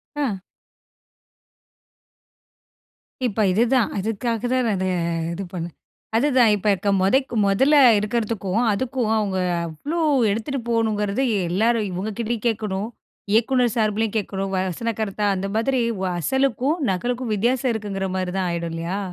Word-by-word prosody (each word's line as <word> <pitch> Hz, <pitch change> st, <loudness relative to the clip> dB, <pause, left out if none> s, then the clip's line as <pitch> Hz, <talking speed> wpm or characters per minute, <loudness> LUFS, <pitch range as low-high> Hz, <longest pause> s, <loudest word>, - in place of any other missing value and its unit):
ஆ. 280 Hz, -7 st, 0 dB, 2.9 s
இப்ப 215 Hz, -1 st, -2 dB
இதுதான். 235 Hz, +4 st, +2 dB
இதுக்காக 225 Hz, +2 st, -2 dB
தான் 255 Hz, -1 st, +2 dB
நான் 210 Hz, -, +1 dB
இத 190 Hz, -, -1 dB, 0.5 s
இது 195 Hz, +3 st, -4 dB
பண்ணேன். 170 Hz, -2 st, -5 dB, 0.4 s
அதுதான் 250 Hz, -4 st, +4 dB
இப்ப 205 Hz, +1 st, -4 dB
இக்க 200 Hz, +2 st, -2 dB
மொதைக்கு 245 Hz, +6 st, +2 dB
மொதல்ல 265 Hz, +10 st, +3 dB, 0.2 s
இருக்கிறதுக்கும், 215 Hz, -1 st, -1 dB
அதுக்கும் 240 Hz, 0 st, -1 dB
அவுங்க 200 Hz, -3 st, -1 dB, 0.3 s
அவ்ளோ 290 Hz, -, -4 dB, 0.3 s
எடுத்துட்டு 240 Hz, +6 st, -2 dB
போகணுங்கிறது 220 Hz, 0 st, 0 dB, 0.3 s
எல்லாரும் 220 Hz, +3 st, +1 dB
இவுங்கக்கிட்டயும் 220 Hz, +5 st, -3 dB
கேட்கணும். 210 Hz, -2 st, -2 dB, 0.4 s
இயக்குநர் 240 Hz, 0 st, +3 dB
சார்பிலயும் 220 Hz, 0 st, 0 dB
கேட்கணும். 195 Hz, -1 st, -3 dB
வசன 190 Hz, +5 st, -2 dB
கருத்தா 210 Hz, -1 st, -1 dB
அந்த 195 Hz, +1 st, -3 dB
மாதிரி 255 Hz, +2 st, +1 dB, 0.2 s
வ 190 Hz, -, 0 dB, 0.2 s
அசலுக்கும், 265 Hz, -, +1 dB
நகலுக்கும் 240 Hz, +4 st, -2 dB
வித்தியாசம் 245 Hz, +4 st, +1 dB
இருக்குங்கிறமாரி 195 Hz, -3 st, -3 dB
தான் 185 Hz, -1 st, 0 dB
ஆயிடும் 170 Hz, -1 st, -3 dB
இல்லயா? 170 Hz, +4 st, -3 dB
220 Hz, 120 wpm, -22 LUFS, 195-240 Hz, 2.9 s, அதுதான்